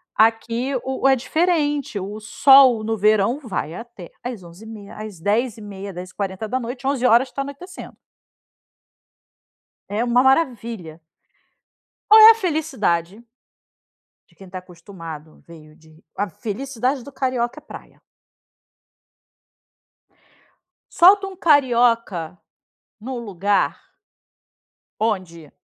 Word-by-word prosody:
aqui 230 +4 +1
o 265 +1 -1
é 270 - +5
diferente. 295 - -1
O 205 +3 -6
sol 250 +2 +5
no 225 +1 -2
verão 215 +5 +2
vai 190 - -5
até 230 -5 -11
às 240 -6 -6
23h30 200 +4 -12
às 215 -5 -9
22h30, 205 -1 -3
22h40, 215 +8 -5
23h 255 -2 +2
tá 275 - -4
anoitecendo. 315 +8 -9 1.9
É 215 +3 -2
uma 245 +1 +2
maravilha. 235 - -1 1.1
Ou 435 - +9
é 440 +1 +11
a - - +2
felicidade 240 - -2 1.0
de - - -29
quem 195 -2 -14
tá 185 0 -7
acostumado 165 -4 -12
veio 155 -2 -15
de 160 0 -22
a 205 0 -2
felicidade 250 - -4
do 280 - -11
carioca 255 -2 -2
é - - -28
praia. - - -13 2.9
Solta 390 +3 +6
um 385 -1 -9
carioca, 235 - +2 0.6
num 255 +3 -6
lugar 200 -3 -1 1.2
onde 185 -8 -3
225 Hz, 100 wpm, -21 LUFS, 190-265 Hz, 2.9 s, é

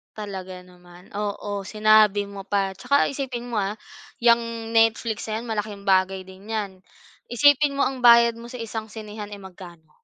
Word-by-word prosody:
Talaga 190 -3 -7
naman, 180 0 -18
oo, 205 -1 -4
sinabi 215 -1 +4
mo 195 -1 -9
pa. 195 -1 0
Tsaka 280 0 +2
isipin 255 -3 -5
mo, 230 - -1
ah, 200 +1 -1 0.5
'yang 230 -1 +2
Netflix 225 -1 +1
na 220 +1 -3
yan 240 - -8
malaking 210 -2 -4
bagay 190 -1 +2
din 190 +2 -15
'yan. 215 -3 -3 0.5
Isipin 290 +3 +4
mo, 280 - +1
ang 265 -1 -1
bayad 235 -1 +6
mo 235 - -10
sa 240 -1 -7
isang 220 -1 -5
sinehan, 210 -1 -8
eh, 200 - -12
magkano? 175 -4 -13
215 Hz, 165 wpm, -24 LUFS, 195-230 Hz, 0.5 s, bayad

